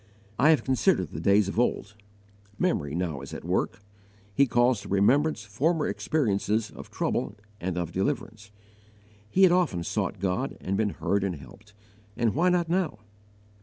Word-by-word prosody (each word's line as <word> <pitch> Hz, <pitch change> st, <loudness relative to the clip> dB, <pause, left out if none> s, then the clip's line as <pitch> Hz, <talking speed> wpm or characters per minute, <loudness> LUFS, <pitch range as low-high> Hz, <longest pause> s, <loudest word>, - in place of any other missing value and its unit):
"I 150 Hz, -, +5 dB
have 160 Hz, -, +4 dB
considered 95 Hz, -, +1 dB
the 75 Hz, -, -6 dB
days 100 Hz, +3 st, +3 dB
of 100 Hz, -, -2 dB
old." 105 Hz, -4 st, 0 dB, 0.6 s
Memory 75 Hz, -5 st, 0 dB
now 85 Hz, -7 st, -2 dB
is 70 Hz, -, -8 dB
at -, -, -8 dB
work. 100 Hz, +2 st, -1 dB, 0.5 s
He 140 Hz, +5 st, +4 dB
calls 120 Hz, -2 st, +2 dB
to -, -, -10 dB
remembrance 125 Hz, +7 st, +2 dB
former 150 Hz, +11 st, 0 dB
experiences 110 Hz, -6 st, 0 dB
of -, -, -11 dB
trouble -, -, -2 dB, 0.2 s
and 90 Hz, 0 st, -3 dB
of 85 Hz, -2 st, -2 dB
deliverance. 105 Hz, +3 st, -3 dB, 0.8 s
He 190 Hz, -, +3 dB
had 185 Hz, -, +7 dB
often 170 Hz, -, +1 dB
sought 100 Hz, +1 st, -2 dB
God 100 Hz, +8 st, -2 dB
and 95 Hz, -, -2 dB
been 105 Hz, +1 st, +1 dB
heard 100 Hz, 0 st, -1 dB
and 95 Hz, -3 st, -1 dB
helped, 100 Hz, +10 st, -15 dB, 0.4 s
and 115 Hz, -3 st, +1 dB
why 175 Hz, +6 st, +3 dB
not 175 Hz, -1 st, +1 dB
now? 180 Hz, 0 st, 0 dB
105 Hz, 165 wpm, -27 LUFS, 95-140 Hz, 0.8 s, had